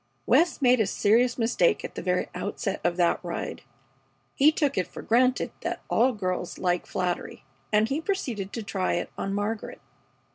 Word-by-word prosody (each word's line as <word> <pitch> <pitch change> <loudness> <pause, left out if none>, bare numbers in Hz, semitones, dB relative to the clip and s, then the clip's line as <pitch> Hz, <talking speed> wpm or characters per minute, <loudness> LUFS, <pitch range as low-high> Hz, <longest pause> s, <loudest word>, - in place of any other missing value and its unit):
West 330 -4 +3
made 250 -1 +5
a 220 - +2
serious 235 +5 +2
mistake 245 - +2
at - - -7
the - - -5
very - - 0
outset - - -3
of 175 0 0
that 175 -1 +3
ride. 175 - -4 0.7
He 295 +3 +5
took 295 -3 0
it 185 - 0
for - - -9
granted 250 +3 +2
that - - -3
all 250 +3 +4
girls 185 -5 -3
like 180 -1 0
flattery, 180 -5 -3 0.3
and 215 +1 +4
he 280 +6 -1
proceeded 245 - -3
to 230 - -4
try 195 -2 -1
it 175 - -2
on 195 - -3
Margaret. 205 +2 -3
220 Hz, 175 wpm, -26 LUFS, 185-255 Hz, 0.7 s, made